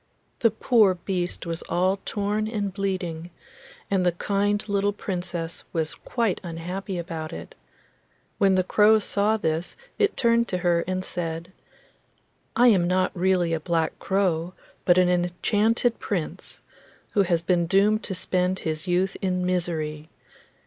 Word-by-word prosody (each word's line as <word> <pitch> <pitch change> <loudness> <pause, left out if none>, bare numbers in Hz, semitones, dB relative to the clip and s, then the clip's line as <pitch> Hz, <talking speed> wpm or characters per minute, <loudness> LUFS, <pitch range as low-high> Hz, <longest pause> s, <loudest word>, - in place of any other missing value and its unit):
The 230 - +4
poor 220 -3 +3
beast 180 0 -3
was 165 -1 -2
all 185 +2 +1
torn 210 +1 -1
and 205 -4 -2
bleeding, 180 -4 -3 0.6
and 190 -2 +2
the 175 -1 +2
kind 205 +3 0
little 205 0 +1
Princess 175 -4 -4
was 160 -2 -1
quite 230 -6 -2
unhappy 180 +3 -5
about 165 -2 -5
it. - - -8 0.9
When 195 -1 +4
the 185 - +3
crow 210 +4 +5
saw 210 +1 +2
this 160 -3 -1 0.2
it 420 0 +2
turned 235 -1 +3
to 180 - -2
her 175 -2 +2
and 185 0 -2
said: 165 0 -4 1.0
'I 245 - +6
am 185 -6 +3
not 185 +1 +2
really 180 -2 +2
a 165 - 0
black 165 0 -1
crow, 185 -3 0 0.3
but 175 0 +5
an 180 -1 +5
enchanted 205 +7 +1
Prince, 180 -7 -4 0.5
who 205 - +3
has 170 -3 +1
been 175 -1 +1
doomed 205 +4 +3
to 190 - -3
spend 185 0 0
his 160 0 -4
youth 185 +2 +1
in 180 -1 0
misery. 160 -4 -2
185 Hz, 145 wpm, -25 LUFS, 170-200 Hz, 1.0 s, I